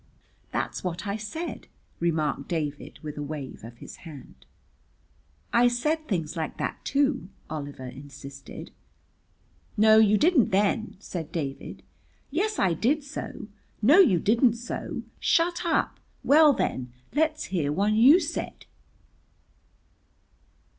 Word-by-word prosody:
"That's -, -, -3 dB
what 175 Hz, 0 st, -3 dB
I 200 Hz, 0 st, -2 dB
said," 220 Hz, +11 st, -6 dB, 0.3 s
remarked 155 Hz, -4 st, 0 dB
David 150 Hz, -4 st, -4 dB
with 150 Hz, -1 st, -6 dB
a -, -, -3 dB
wave 145 Hz, -5 st, -6 dB
of 115 Hz, +1 st, -10 dB
his -, -, -11 dB
hand. 150 Hz, -6 st, -13 dB, 1.1 s
"I 240 Hz, +1 st, +6 dB
said 305 Hz, +7 st, 0 dB
things 170 Hz, -5 st, -2 dB
like 160 Hz, -2 st, -4 dB
that, -, -, -4 dB
too," 275 Hz, -7 st, 0 dB, 0.2 s
Oliver 145 Hz, -4 st, -6 dB
insisted. 140 Hz, +1 st, -10 dB, 1.1 s
"No, 215 Hz, +1 st, +7 dB
you 215 Hz, -1 st, +5 dB
didn't 300 Hz, -, +4 dB
then," 205 Hz, +3 st, +1 dB
said 175 Hz, -5 st, -6 dB
David. 140 Hz, -5 st, -5 dB, 0.5 s
"Yes, 425 Hz, +8 st, 0 dB
I 180 Hz, -, +2 dB
did 275 Hz, -, +1 dB
so." 280 Hz, -5 st, -7 dB, 0.4 s
"No, 290 Hz, -, +7 dB
you 215 Hz, -, +6 dB
didn't 235 Hz, +5 st, +3 dB
so." 235 Hz, +1 st, -5 dB, 0.2 s
"Shut 345 Hz, +1 st, +2 dB
up." 330 Hz, -, 0 dB, 0.2 s
"Well, 300 Hz, +1 st, +7 dB
then, 130 Hz, -, -2 dB, 0.2 s
let's 310 Hz, +1 st, +1 dB
hear 150 Hz, -6 st, +1 dB
one 200 Hz, +7 st, +1 dB
you 260 Hz, +11 st, +7 dB
said." 325 Hz, -2 st, -5 dB
205 Hz, 125 wpm, -26 LUFS, -, 1.1 s, No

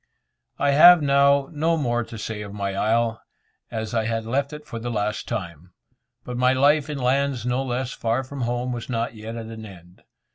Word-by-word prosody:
I 145 Hz, -, +2 dB
have 165 Hz, +3 st, +8 dB
now 140 Hz, 0 st, +3 dB
no 165 Hz, +2 st, +1 dB
more 120 Hz, -5 st, 0 dB
to 115 Hz, -, -9 dB
say 105 Hz, 0 st, -5 dB
of 100 Hz, 0 st, -8 dB
my 100 Hz, -1 st, -2 dB
isle, 115 Hz, +2 st, 0 dB, 0.5 s
as 110 Hz, 0 st, -4 dB
I 110 Hz, -2 st, +1 dB
had 115 Hz, 0 st, -2 dB
left 140 Hz, +5 st, -1 dB
it 150 Hz, 0 st, -9 dB
for 115 Hz, -6 st, -6 dB
the 120 Hz, +2 st, -4 dB
last 105 Hz, -2 st, -2 dB
time, 85 Hz, -2 st, -6 dB, 0.5 s
but 125 Hz, -1 st, -6 dB
my 125 Hz, +1 st, +3 dB
life 145 Hz, +3 st, +3 dB
in 150 Hz, -, -3 dB
lands 135 Hz, -1 st, 0 dB
no 125 Hz, +1 st, 0 dB
less 125 Hz, 0 st, -2 dB
far 115 Hz, +3 st, -1 dB
from 135 Hz, +1 st, -7 dB
home 120 Hz, +1 st, -1 dB
was 120 Hz, 0 st, -5 dB
not 115 Hz, -1 st, -2 dB
yet 110 Hz, +1 st, -8 dB
at 115 Hz, -1 st, -6 dB
an 110 Hz, 0 st, -9 dB
end. 90 Hz, -4 st, -14 dB
120 Hz, 205 wpm, -23 LUFS, 110-140 Hz, 0.5 s, have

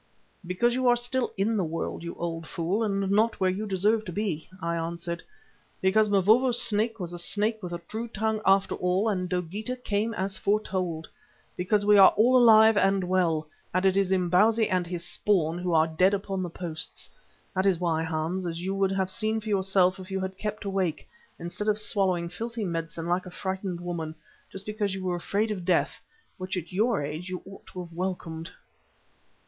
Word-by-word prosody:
"Because 210 Hz, +7 st, +1 dB
you 255 Hz, 0 st, +1 dB
are 245 Hz, -, +6 dB
still 245 Hz, +1 st, -1 dB
in 210 Hz, +4 st, +1 dB
the 195 Hz, -, +1 dB
world, 165 Hz, 0 st, -4 dB
you 170 Hz, 0 st, -6 dB
old 165 Hz, -1 st, -4 dB
fool, 175 Hz, +6 st, -1 dB
and 195 Hz, -3 st, 0 dB
not 220 Hz, +3 st, +2 dB
where 185 Hz, -1 st, +3 dB
you 210 Hz, +3 st, -4 dB
deserve 210 Hz, +3 st, +2 dB
to 180 Hz, -, -5 dB
be," 175 Hz, -5 st, -3 dB
I 170 Hz, 0 st, -2 dB
answered. 170 Hz, +1 st, -4 dB, 0.6 s
"Because 210 Hz, +3 st, +3 dB
Mavovo's 220 Hz, +6 st, +4 dB
Snake 220 Hz, +2 st, +2 dB
was 175 Hz, -2 st, -4 dB
a 175 Hz, -, -5 dB
snake 210 Hz, +5 st, 0 dB
with 180 Hz, -2 st, -6 dB
a 175 Hz, -, -3 dB
true 225 Hz, +2 st, -4 dB
tongue 220 Hz, -1 st, -1 dB
after 195 Hz, 0 st, +3 dB
all, 180 Hz, +4 st, 0 dB
and 185 Hz, -4 st, -1 dB
Dogeetah 190 Hz, +7 st, -3 dB
came 215 Hz, +2 st, -1 dB
as 190 Hz, 0 st, -2 dB
it -, -, -12 dB
foretold. 185 Hz, -6 st, -1 dB, 0.5 s
Because 205 Hz, +3 st, +1 dB
we 210 Hz, -1 st, +6 dB
are 190 Hz, -, +8 dB
all 240 Hz, +4 st, +5 dB
alive 220 Hz, -3 st, +7 dB
and 195 Hz, -1 st, +3 dB
well, 175 Hz, -4 st, +1 dB, 0.3 s
and 185 Hz, +1 st, +2 dB
it 190 Hz, -1 st, +4 dB
is 195 Hz, -1 st, +2 dB
Imbozwi 190 Hz, +5 st, +3 dB
with 180 Hz, -1 st, 0 dB
his 170 Hz, -1 st, -4 dB
spawn 175 Hz, -5 st, +1 dB
who 180 Hz, 0 st, -2 dB
are 160 Hz, -1 st, +4 dB
dead 180 Hz, +5 st, +3 dB
upon 195 Hz, -1 st, -3 dB
the 180 Hz, -, -3 dB
posts. 165 Hz, -2 st, -5 dB, 0.5 s
That 190 Hz, +1 st, +1 dB
is 190 Hz, -3 st, +3 dB
why, 165 Hz, -3 st, 0 dB
Hans, 165 Hz, +3 st, -2 dB
as 165 Hz, -1 st, -4 dB
you 190 Hz, +2 st, -2 dB
would 195 Hz, -1 st, +1 dB
have 190 Hz, -1 st, 0 dB
seen 220 Hz, +1 st, 0 dB
for 215 Hz, 0 st, -7 dB
yourself 190 Hz, -1 st, +2 dB
if 185 Hz, +1 st, -9 dB
you 190 Hz, 0 st, -2 dB
had 190 Hz, 0 st, -4 dB
kept 210 Hz, +1 st, -5 dB
awake, 190 Hz, -5 st, -1 dB, 0.3 s
instead 175 Hz, +5 st, -5 dB
of 210 Hz, -1 st, +2 dB
swallowing 190 Hz, -5 st, +1 dB
filthy 225 Hz, +5 st, -4 dB
medicine 165 Hz, -1 st, -4 dB
like 175 Hz, +2 st, -1 dB
a -, -, -6 dB
frightened 190 Hz, -1 st, -4 dB
woman, 170 Hz, -3 st, -4 dB, 0.4 s
just 195 Hz, 0 st, -6 dB
because 210 Hz, -2 st, -2 dB
you 190 Hz, -, -6 dB
were 180 Hz, -1 st, -1 dB
afraid 205 Hz, +5 st, -1 dB
of 190 Hz, -4 st, -4 dB
death, 180 Hz, -1 st, +1 dB, 0.4 s
which 185 Hz, 0 st, -3 dB
at 175 Hz, +1 st, -6 dB
your 215 Hz, -3 st, +1 dB
age 155 Hz, +5 st, -5 dB
you 185 Hz, -1 st, -5 dB
ought 195 Hz, -, -13 dB
to 185 Hz, -, -7 dB
have 170 Hz, -1 st, -13 dB
welcomed." 170 Hz, -2 st, -4 dB
190 Hz, 200 wpm, -27 LUFS, 175-210 Hz, 0.6 s, are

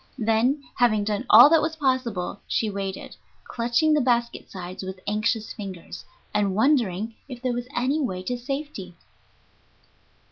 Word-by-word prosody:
Then, 235 Hz, +5 st, +1 dB
having 220 Hz, -4 st, +3 dB
done 205 Hz, -1 st, -2 dB
all 230 Hz, +5 st, +10 dB
that 325 Hz, -2 st, +6 dB
was 320 Hz, +1 st, -2 dB
possible, 255 Hz, -, -1 dB
she 220 Hz, -2 st, 0 dB
waited, 195 Hz, -1 st, -5 dB, 0.3 s
clutching 240 Hz, +7 st, +1 dB
the 300 Hz, -, +3 dB
basket 235 Hz, -2 st, 0 dB
sides 185 Hz, -1 st, -7 dB
with 190 Hz, 0 st, -7 dB
anxious 215 Hz, +1 st, -1 dB
fingers, 190 Hz, -4 st, -8 dB, 0.3 s
and 205 Hz, -2 st, +1 dB
wondering 225 Hz, -4 st, +1 dB, 0.2 s
if 250 Hz, -2 st, -7 dB
there 255 Hz, -1 st, 0 dB
was 245 Hz, 0 st, -4 dB
any 270 Hz, +6 st, +1 dB
way 185 Hz, -9 st, -3 dB
to 245 Hz, +6 st, -2 dB
safety. 245 Hz, -, -6 dB
230 Hz, 145 wpm, -25 LUFS, 200-255 Hz, 0.3 s, all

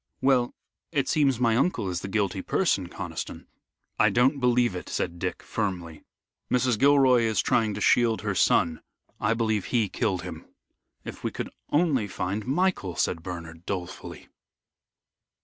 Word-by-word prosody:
"Well, 130 Hz, -2 st, +2 dB, 0.4 s
it 140 Hz, -4 st, 0 dB
seems 140 Hz, -5 st, +2 dB
my 115 Hz, -3 st, +3 dB
uncle 120 Hz, -, +1 dB
is 90 Hz, -1 st, -2 dB
the -, -, -5 dB
guilty 100 Hz, -2 st, -1 dB
person, 95 Hz, -, 0 dB
Conniston." -, -, -6 dB, 0.5 s
"I -, -, +5 dB
don't 130 Hz, +4 st, +3 dB
believe 125 Hz, -4 st, +2 dB
it," 90 Hz, -, -6 dB
said 85 Hz, -1 st, -3 dB
Dick, 90 Hz, 0 st, -3 dB
firmly. 90 Hz, -7 st, -3 dB, 0.5 s
"Mrs. 125 Hz, -3 st, +2 dB
Gilroy 135 Hz, -3 st, +5 dB
is 110 Hz, -1 st, +1 dB
trying 110 Hz, -3 st, +2 dB
to 105 Hz, -, -5 dB
shield 115 Hz, 0 st, +3 dB
her 105 Hz, -2 st, -1 dB
son. 80 Hz, -3 st, +2 dB, 0.4 s
I 115 Hz, +2 st, +1 dB
believe 110 Hz, -3 st, 0 dB
he 115 Hz, -5 st, +1 dB
killed 95 Hz, -2 st, -1 dB
him." -, -, -8 dB, 0.6 s
"If -, -, -8 dB
we -, -, 0 dB
could -, -, -6 dB, 0.2 s
only 145 Hz, -8 st, +2 dB
find 95 Hz, +3 st, -3 dB
Michael," 145 Hz, -, 0 dB
said 85 Hz, +2 st, 0 dB
Bernard, 85 Hz, -1 st, -8 dB
dolefully. 90 Hz, -3 st, -6 dB
110 Hz, 150 wpm, -26 LUFS, 90-125 Hz, 0.6 s, I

